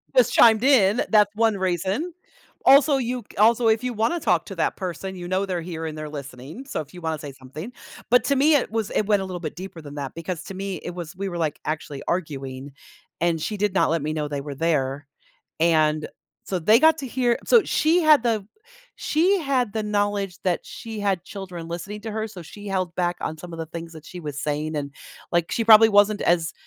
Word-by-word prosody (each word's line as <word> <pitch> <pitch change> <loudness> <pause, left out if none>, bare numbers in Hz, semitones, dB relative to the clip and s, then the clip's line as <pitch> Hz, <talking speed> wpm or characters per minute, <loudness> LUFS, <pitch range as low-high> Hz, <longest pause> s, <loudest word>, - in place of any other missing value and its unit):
Just - - +4
chimed 225 0 +6
in, 235 -6 +4
that's 210 -2 +4
1 225 -1 +2
reason, 190 - -1 0.5
also, 275 +1 +6
you 250 -1 -2
c - - -19
also, 230 +3 +4
if 220 +2 +2
you 250 - -1
wanna 230 +11 0
talk 180 - +1
to 195 - -8
that - - 0
person, 190 +1 -5
you 175 -1 -7
know 190 +2 0
they're 180 -2 -2
here 165 -1 -5
and 155 -1 -6
they're 155 0 -6
listening, 140 - -8
so 270 - -4
if 150 +2 -13
you 180 - -10
wanna 160 -1 -2
say 145 -1 -7
something, 135 - -9 0.4
but 245 - +6
to 280 - +2
me, 295 +3 +4
it 275 - +1
was 220 -2 -2
it 215 - +2
went 205 -2 +3
a - - -3
little 185 -1 -5
bit 155 -4 -6
deeper 180 -1 -8
than 145 -1 -10
that 140 -2 -5
because 165 +1 -5
to - - -7
me, 195 0 -4
it - - -4
was 175 0 -7
we 195 +2 -4
were, 175 - -5
like, 155 -3 -1
actually 150 -2 -4
arguing, 140 -5 -4 0.5
and 170 -2 +1
she 210 +6 -3
did 205 -1 0
not 195 - +3
let 165 0 0
me 155 +1 -2
know 150 -1 -2
they 145 -1 -4
were 145 0 -6
there, 145 -2 -1 0.5
and 155 -2 +2 0.4
so 190 - -2
they 215 +7 +5
got 320 +1 +5
to 275 - -5
hear 245 -1 +1
so 465 -5 +5
she 325 +4 +2
had 305 -6 +6
the 220 -4 0 0.5
she 360 +6 +2
had 260 - 0
the 220 - -1
knowledge 205 -3 -1
that 180 -2 0
she 225 -2 -8
had 195 -4 0
children 185 -4 -8
listening 175 +5 -6
to 220 - -6
her, 220 +1 -3
so 195 -5 -10
she 205 +6 -11
held 185 -3 -2
back 175 -1 0
on 160 - -3
some 175 +1 -10
of 165 - -7
the 165 - -3
things 165 +1 -8
that 155 -1 -12
she 180 - -9
was 150 -3 -5
saying, 155 +1 -2
and, 140 -1 -3 0.4
like, 170 -1 +1
she 230 - 0
probably 220 0 +8
wasn't 205 0 +4
as 170 -1 +1
185 Hz, 230 wpm, -24 LUFS, 160-220 Hz, 0.5 s, probably